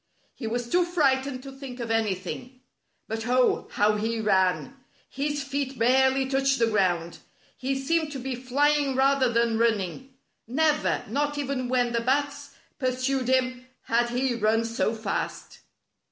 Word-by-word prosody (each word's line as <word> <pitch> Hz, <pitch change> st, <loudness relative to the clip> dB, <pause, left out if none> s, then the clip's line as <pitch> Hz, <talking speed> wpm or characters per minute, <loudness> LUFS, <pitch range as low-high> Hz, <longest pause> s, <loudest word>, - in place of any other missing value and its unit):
He 230 Hz, -, -6 dB
was 240 Hz, +1 st, -2 dB
too 355 Hz, +8 st, +3 dB
frightened 275 Hz, -6 st, +1 dB
to 275 Hz, -, -8 dB
think 265 Hz, -2 st, -9 dB
of 230 Hz, -1 st, -3 dB
anything. 225 Hz, +4 st, -2 dB, 0.5 s
But, 225 Hz, +1 st, -4 dB
oh, 250 Hz, 0 st, +2 dB
how 210 Hz, +1 st, +3 dB
he 225 Hz, +2 st, -1 dB
ran! 190 Hz, +4 st, +1 dB, 0.3 s
His 290 Hz, +1 st, -2 dB
feet 275 Hz, -1 st, -3 dB
barely 265 Hz, +3 st, +3 dB
touched 270 Hz, 0 st, +1 dB
the 230 Hz, -, +3 dB
ground. 180 Hz, -6 st, 0 dB, 0.4 s
He 270 Hz, +1 st, -2 dB
seemed 310 Hz, +3 st, 0 dB
to -, -, -4 dB
be 265 Hz, 0 st, -4 dB
flying 275 Hz, +3 st, +1 dB
rather 265 Hz, -1 st, +3 dB
than 230 Hz, -1 st, +1 dB
run 230 Hz, -2 st, +3 dB
ning. 255 Hz, +8 st, -7 dB, 0.3 s
Never 300 Hz, +4 st, +1 dB
— -, -, -18 dB
not 290 Hz, +6 st, -1 dB
even 270 Hz, -3 st, -2 dB
when 245 Hz, -2 st, +1 dB
the 235 Hz, -, +1 dB
Bats 285 Hz, +3 st, -1 dB, 0.2 s
pursued 255 Hz, 0 st, 0 dB
him 255 Hz, -1 st, 0 dB
— -, -, -47 dB
had 240 Hz, +1 st, +3 dB
he 250 Hz, +1 st, 0 dB
run 225 Hz, 0 st, +1 dB
so 230 Hz, 0 st, -1 dB
fast. 220 Hz, -, -4 dB
255 Hz, 160 wpm, -26 LUFS, 230-275 Hz, 0.5 s, too